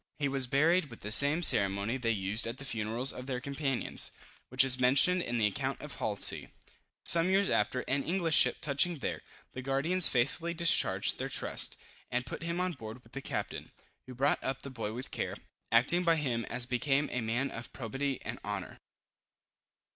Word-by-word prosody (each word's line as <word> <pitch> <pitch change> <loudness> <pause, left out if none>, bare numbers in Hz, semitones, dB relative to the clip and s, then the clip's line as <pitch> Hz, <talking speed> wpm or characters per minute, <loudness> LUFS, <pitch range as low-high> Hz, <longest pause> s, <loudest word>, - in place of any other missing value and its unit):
He 145 - -1
was 135 -2 +1
buried 160 +7 +2
with 120 -6 -14
the 105 - -6
same 145 +8 +5
ceremony 100 -2 +3
they 125 -3 -2
used 105 +1 -1
at 115 +2 -6
the 140 - -9
funerals 115 +2 -1
of 125 +1 -9
their 130 -2 -3
companions, 135 0 -2 0.4
which 130 +2 +4
is 130 -1 +6
mentioned 140 +9 +4
in 120 -7 -3
the 110 - +2
account 105 - -2
of - - -8
Halsey. - - 0 0.6
Some 170 +1 +8
years 195 +1 +2
after, 125 +4 0
an 140 +2 -2
English 170 -2 0
ship - - +4
touching 155 +4 +1
there, 135 - -4 0.3
the 125 - -6
guardians 145 +7 +2
faithfully 160 +7 0
discharged 170 0 +3
their - - -3
trust, - - -1 0.3
and 125 0 -2
put - - -7
him 170 +1 -3
on 185 0 -1
board 120 -4 -10
with 115 - -22
the 140 - -6
captain, - - -5 0.4
who 130 - -10
brought 140 +4 0
up 130 0 -4
the 140 - -7
boy 115 -4 -5
with 125 +4 -7
care, - - -4 0.4
acting 140 +10 +3
by 165 -1 +3
him 125 -7 -2
as 125 - -3
became 135 +3 0
a 125 - -2
man 120 +5 -2
of 115 +1 -8
probity 135 +3 -4
and - - -6
honor. - - -6
135 Hz, 190 wpm, -30 LUFS, 120-150 Hz, 0.6 s, Some